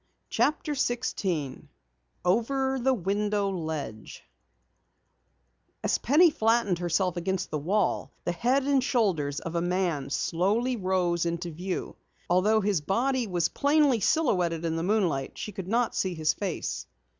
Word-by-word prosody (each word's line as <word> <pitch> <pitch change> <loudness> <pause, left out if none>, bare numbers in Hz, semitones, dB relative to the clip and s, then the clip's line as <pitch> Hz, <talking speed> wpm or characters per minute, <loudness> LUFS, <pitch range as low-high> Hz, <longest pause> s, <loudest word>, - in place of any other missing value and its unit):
CHAPTER 300 0 +1
16 195 - -2 0.6
OVER 265 +7 +1
THE 265 +2 +2
WINDOW 205 0 0
LEDGE 155 - -5 1.6
As - - +1
Penny 310 +7 +5
flattened 225 -8 +2
herself 175 +1 0
against 185 +1 -2
the 150 - -1
wall, 190 +6 0
the - - 0
head 245 +10 +1
and 275 -1 +2
shoulders 175 - 0
of 165 - -6
a 170 - 0
man 175 -6 -1
slowly 205 - 0
rose 180 -4 0
into 170 +1 -3
view. 180 +4 -5 0.3
Although 210 +5 +4
his 200 -5 +1
body 240 - 0
was 175 -3 0
plainly 285 -4 +3
silhouetted 180 - +1
in 165 -1 -1
the 165 - -1
moonlight, 175 -8 0
she 210 - -5
could 190 -2 -7
not 235 +3 +1
see 185 -2 -1
his 155 -1 +1
face. 190 -5 -4
190 Hz, 135 wpm, -27 LUFS, 170-235 Hz, 1.6 s, Penny